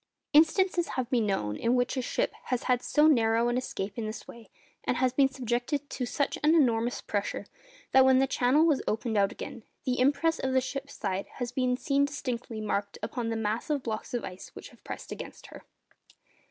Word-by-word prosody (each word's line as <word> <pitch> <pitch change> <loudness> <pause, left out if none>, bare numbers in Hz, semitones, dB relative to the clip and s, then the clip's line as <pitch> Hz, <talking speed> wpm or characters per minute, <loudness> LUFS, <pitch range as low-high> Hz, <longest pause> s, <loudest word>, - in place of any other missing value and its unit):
Instances 345 +3 +4
have 255 -1 -2
been 235 -4 +2
known 105 - -1
in 235 - +1
which 245 +1 +1
a 260 - 0
ship 250 - -1
has 250 -2 -1
had 250 -1 +2
so 300 0 +3
narrow 230 -5 +4
an 240 - 0
escape 210 -5 -3
in 220 - -2
this 215 - -7
way, 230 -3 -12 0.3
and 250 - 0
has 255 -1 +2
been 270 0 +4
subjected 260 +2 -2
to 250 - -3
such 285 +3 -1
an 310 +2 +5
enormous 240 -5 +2
pressure, 205 -1 -3 0.5
that 265 - +7
when 260 0 +6
the 265 - +4
channel 265 +4 +3
was 305 -5 +3
opened 220 +1 -1
out 200 -1 +3
again, 235 - -8 0.2
the 255 -2 0
impress 285 +5 +2
of 265 0 -1
the 260 - +5
ship's 275 +2 -5
side 190 +1 -2
has 245 -2 -3
been 250 0 +1
seen 280 +1 +2
distinctly 245 -5 -4
marked 205 -1 -2
upon 240 -2 -3
the 225 - -1
massive 225 +6 -1
blocks 220 +1 -4
of 240 - -2
ice 185 0 -9
which - - -9
have - - -21
pressed - - -7
against - - -8
her. - - -11
250 Hz, 205 wpm, -29 LUFS, 225-275 Hz, 0.5 s, that